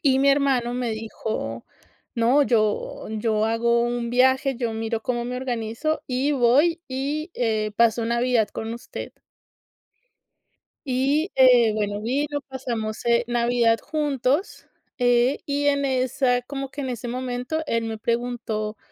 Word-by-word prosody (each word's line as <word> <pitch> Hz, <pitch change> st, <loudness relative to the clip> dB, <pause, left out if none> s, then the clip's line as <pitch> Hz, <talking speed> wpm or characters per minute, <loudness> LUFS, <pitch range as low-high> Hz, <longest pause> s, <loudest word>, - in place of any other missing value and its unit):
Y 265 Hz, -2 st, +4 dB
mi 280 Hz, -, +4 dB
hermano 270 Hz, -4 st, +2 dB
me 245 Hz, -2 st, -1 dB
dijo: 220 Hz, -, -4 dB, 0.5 s
"No, 245 Hz, +5 st, +4 dB
yo 215 Hz, -5 st, 0 dB
yo 215 Hz, 0 st, 0 dB
hago 235 Hz, +1 st, +2 dB
un 240 Hz, 0 st, -1 dB
viaje, 260 Hz, +2 st, +3 dB
yo 235 Hz, -2 st, -2 dB
miro 225 Hz, 0 st, -2 dB
cómo 240 Hz, -1 st, -2 dB
me 250 Hz, +1 st, -4 dB
organizo, 250 Hz, +4 st, -2 dB
y 260 Hz, +3 st, 0 dB
voy 285 Hz, +7 st, +3 dB
y, 285 Hz, +5 st, -3 dB
eh, 215 Hz, -3 st, 0 dB
paso 230 Hz, 0 st, +3 dB
Navidad 235 Hz, -2 st, +2 dB
con 225 Hz, +1 st, -5 dB
usted". 240 Hz, -, -8 dB, 1.7 s
Y, 275 Hz, +6 st, +1 dB
eh, 245 Hz, -4 st, +6 dB
bueno, 205 Hz, -1 st, -2 dB
vino, 290 Hz, +5 st, -1 dB
pasamos, 235 Hz, -5 st, -4 dB
eh, 235 Hz, 0 st, +3 dB
Navidad 235 Hz, -1 st, +2 dB
juntos, 295 Hz, -, -1 dB, 0.3 s
eh, 245 Hz, +1 st, +3 dB
y 285 Hz, 0 st, -1 dB
en 280 Hz, -1 st, +2 dB
esa 255 Hz, -1 st, +1 dB
como 275 Hz, +1 st, -5 dB
que 285 Hz, +1 st, -6 dB
en 260 Hz, -, -3 dB
ese 240 Hz, 0 st, -5 dB
momento 250 Hz, +4 st, -3 dB
él 230 Hz, 0 st, 0 dB
me 225 Hz, -1 st, -4 dB
preguntó 230 Hz, -2 st, -2 dB
245 Hz, 140 wpm, -24 LUFS, 230-270 Hz, 1.7 s, eh